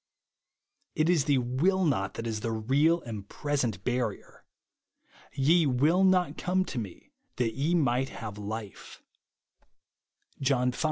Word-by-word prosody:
It 155 +2 +2
is 155 -6 +2
the 145 -3 +3
will 150 +10 +1
not 95 -10 0
that 115 - -5
is 110 -2 -2
the 115 +2 -3
real 140 +10 +2
and 105 -4 -8
present 130 - -2
barrier. 125 -5 -3 0.9
"Ye 155 +4 +3
ivill 150 +9 +3
not 185 -1 +3
come 185 +1 +1
to 125 - -2
me 100 -6 -9 0.2
that 115 -3 0
ye 150 +7 0
might 135 -4 +1
have 105 -2 -7
life," 105 0 -7 1.4
(John 125 -2 +2
v. - - -9
130 Hz, 135 wpm, -28 LUFS, 115-155 Hz, 1.4 s, the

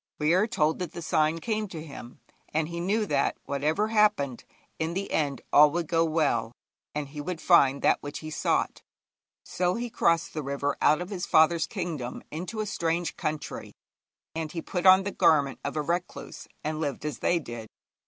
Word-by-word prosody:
We 155 +2 +2
are 190 +5 +3
told 155 -7 +1
that 180 -3 -4
the 170 - -6
sign 155 +1 +2
came 215 +3 -2
to 165 -5 -7
him, 135 -5 -11 0.3
and 155 +1 0
he 170 0 -5
knew 205 +5 +1
that, 145 -7 0
whatever 155 +10 0
happened, 210 - +2 0.3
in 160 +2 -2
the 195 +1 -3
end 145 -3 -1
all 150 +1 +8
would 175 0 -1
go 165 0 +2
well, 145 -8 0 0.4
and 150 -2 -3
he 145 +1 -6
would 170 +2 -4
find 140 -7 +4
that - - +3
which 145 0 -6
he 155 0 -7
sought. - - 0 0.6
So 180 0 0
he 240 0 -4
crossed 165 -4 +1
the 155 - -3
river 140 0 -2
out 155 +3 +4
of 180 +3 -6
his 180 -3 -4
father's 160 +1 +4
kingdom 165 - -5
into 180 +7 -4
a - - -2
strange 170 -3 -1
country, 155 -1 -4 0.6
and 160 -1 -4
he 165 - -4
put 180 0 -1
on 190 +1 +8
the 200 - -3
garment 145 -7 +3
of 140 +2 -3
a 150 - 0
recluse, 175 +3 -4 0.2
and 155 +1 -2
lived 145 -1 -3
as 150 -4 -4
they 175 - +2
did. 120 -8 -7
160 Hz, 195 wpm, -27 LUFS, 150-180 Hz, 0.6 s, all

